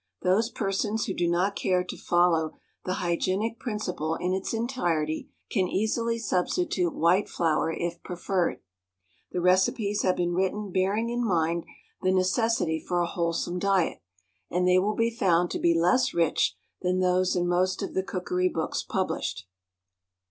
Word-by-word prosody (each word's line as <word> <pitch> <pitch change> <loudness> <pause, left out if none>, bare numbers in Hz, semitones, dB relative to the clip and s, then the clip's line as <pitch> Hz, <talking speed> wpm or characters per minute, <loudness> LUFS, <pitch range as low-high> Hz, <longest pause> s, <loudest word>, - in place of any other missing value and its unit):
Those 205 +6 +3
persons 210 0 -1
who 190 - -2
do 175 - 0
not 180 +4 +1
care 180 -1 +1
to 180 - -7
follow 175 -2 +2 0.3
the 185 - -1
hygienic 190 +6 0
principle 180 - -2
in 180 +2 -1
its 190 0 -2
entirety 175 -11 -1 0.2
can 190 -5 +1
easily 230 +4 0
substitute 185 - 0
white 180 +5 +3
flour 165 -1 +1
if 170 +1 -4
preferred. 180 0 -1 0.7
The 180 - -2
recipes 190 +3 +2
have 185 - +2
been 175 0 0
written 190 +2 -1
bearing 195 +5 +1
in 240 0 -1
mind 170 -5 +1 0.4
the 185 - +2
necessity 185 -2 +1
for 175 +2 -2
a 175 - +2
wholesome 170 0 -2
diet; 190 - +1 0.5
and 180 +1 +1
they 180 0 +5
will 210 +3 0
be 230 0 +1
found 180 -6 +2
to - - -2
be 170 -1 +3
less 250 +11 +3
rich 165 -2 +2 0.3
than 180 0 +1
those 185 0 +2
in 175 -1 +1
most 185 +1 +1
of - - -5
the 190 - +1
cookery 180 -1 -1
books 160 -2 -2
published. - - -3
185 Hz, 155 wpm, -27 LUFS, 175-205 Hz, 0.7 s, they